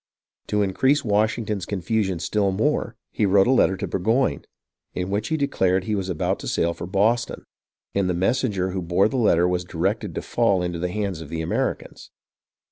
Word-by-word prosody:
To 105 0 +1
increase 130 +10 +2
Washington's 105 -2 0
confusion 100 -1 -1
still 100 +3 0
more, 115 +4 0 0.2
he 105 - +1
wrote 95 0 +5
a - - +3
letter 95 -7 +3
to - - -3
Burgoyne, 115 +8 0 0.5
in 90 +1 -3
which 105 +2 -1
he 160 - 0
declared 95 -10 +1
he 110 - -2
was 95 -2 -2
about 85 - -1
to - - -7
sail 85 0 +1
for 85 +1 -7
Boston; 110 +5 +1 0.5
and 100 -2 +1
the 90 - 0
messenger 95 -1 0
who 95 0 -3
bore 90 +4 +2
the 130 - -3
letter 90 -7 +3
was 90 0 0
directed 90 - -2
to - - -3
fall 100 -6 +1
into 90 -1 -3
the 90 +1 -1
hands 100 -3 -3
of 80 - -9
the 80 0 -3
Americans. 80 - -3
100 Hz, 190 wpm, -23 LUFS, 90-110 Hz, 0.5 s, wrote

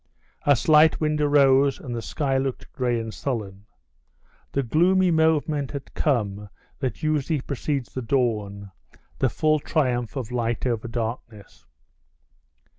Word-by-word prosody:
A 145 - +7
slight 155 +4 +5
wind 150 -1 0
arose, 140 -2 +4
and 120 -3 -6
the 115 - -3
sky 135 +1 -1
looked 135 -1 -4
gray 120 -2 0
and 115 -1 -5
sullen. 105 -6 -5 0.9
The 140 - +1
gloomy 180 +8 +3
moment 155 -3 +1
had 140 -2 -7
come 105 -7 -1 0.3
that 130 +4 -4
usually 155 0 0
precedes 140 -1 -3
the 130 - -3
dawn, 105 -5 -1 0.5
the 130 - +2
full 155 +5 +1
triumph 125 -6 -1
of 125 -4 -4
light 120 -1 -1
over 120 -2 -1
darkness. 115 -2 -6
130 Hz, 130 wpm, -24 LUFS, 115-150 Hz, 0.9 s, A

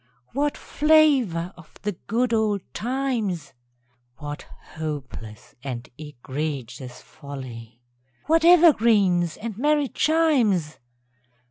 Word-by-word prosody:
_) - - -36
What 290 +3 0
flavour 275 - +3
of 175 -3 -17
the 210 - 0 0.2
good 235 +2 +1
old 215 -3 +1
times! 235 - -2 0.6
(What 145 -1 -7 0.3
hopeless 140 -8 -7
and 125 -3 -5
egregious 130 -3 -6
folly!) 120 -5 -10 0.4
What 325 +2 +3
evergreens 220 - +5
and 225 -2 -5
merry 295 0 +2
chimes! 250 - +2
190 Hz, 95 wpm, -24 LUFS, -, 0.6 s, evergreens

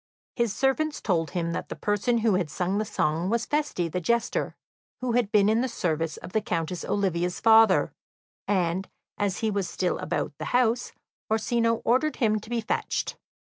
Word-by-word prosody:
His 235 -3 +1
servants 295 +3 +1
told 165 -5 0
him 170 -2 -2
that - - -4
the - - -5
person 210 +4 0
who 220 - +4
had 185 -4 0
sung 185 +6 -1
the 215 - -1
song 170 -4 0
was 235 +1 0
Feste 290 - -1
the 180 - -2
jester, 235 +5 0 0.4
who 255 -1 -1
had 230 -3 +1
been 205 -2 +4
in 220 +2 +3
the 260 - 0
service 165 -8 -2
of - - -9
the 220 - +1
Countess 170 0 -2
Olivia's 180 -3 -1
father, 225 -1 +5 0.5
and, 185 -1 0 0.3
as 200 -3 -1
he 220 -1 +1
was 200 -3 -1
still 180 -1 -1
about - - -2
the - - -4
house, 245 0 +1 0.4
Orsino 230 +1 +1
ordered 260 +6 +2
him 215 -4 +2
to 215 - -13
be 240 -1 -1
fetched. 220 - -2
210 Hz, 180 wpm, -26 LUFS, 180-235 Hz, 0.5 s, father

